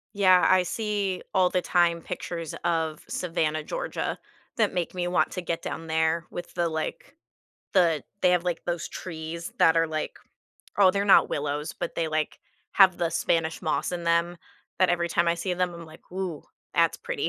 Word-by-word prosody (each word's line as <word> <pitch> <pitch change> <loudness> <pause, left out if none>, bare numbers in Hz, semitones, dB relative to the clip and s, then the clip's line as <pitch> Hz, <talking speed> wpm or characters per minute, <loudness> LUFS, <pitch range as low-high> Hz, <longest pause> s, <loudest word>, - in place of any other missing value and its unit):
Yeah, 185 -3 +5
I 185 0 +5
see 205 -1 -2
all 185 -2 +4
the 180 - 0
time 170 -1 +2
pictures 170 -2 -5
of 160 -2 -1
Savannah, 155 -3 -1
Georgia - - -3 0.4
that 215 -3 +3
make 175 -2 -2
me 180 -1 -2
want 175 - +1
to 180 - -4
get 170 -1 -3
down 165 - -5
there 160 +1 +1
with 175 - -7
the, 170 -1 0
like 160 - -5 0.6
the 170 -5 +3 0.2
they 180 - +4
have, 180 -1 +2
like, 175 -1 -2
those 175 -1 -2
trees 165 -1 -6
that 165 0 +5
are, 165 0 +4
like 155 -1 -4 0.6
oh, 195 -2 +7
they're 200 +1 0
not 195 - +6
willows, 145 +2 -2
but - - -5
they, 165 - 0
like, 155 -1 -2 0.3
have 190 -3 +6
the 170 - +1
Spanish 165 0 0
moss 155 - -1
in 175 -1 -4
them. 170 +1 +1 0.4
But, 185 -1 +4
every 170 -1 +1
time 170 +1 +1
I 170 - +3
see 180 +1 -2
them, 180 0 0
I'm 170 0 -9
like, 155 +1 -15
"Ooh, 185 -5 -4 0.3
that's - - +3
pretty." 475 -3 -2
175 Hz, 190 wpm, -26 LUFS, 165-185 Hz, 0.6 s, oh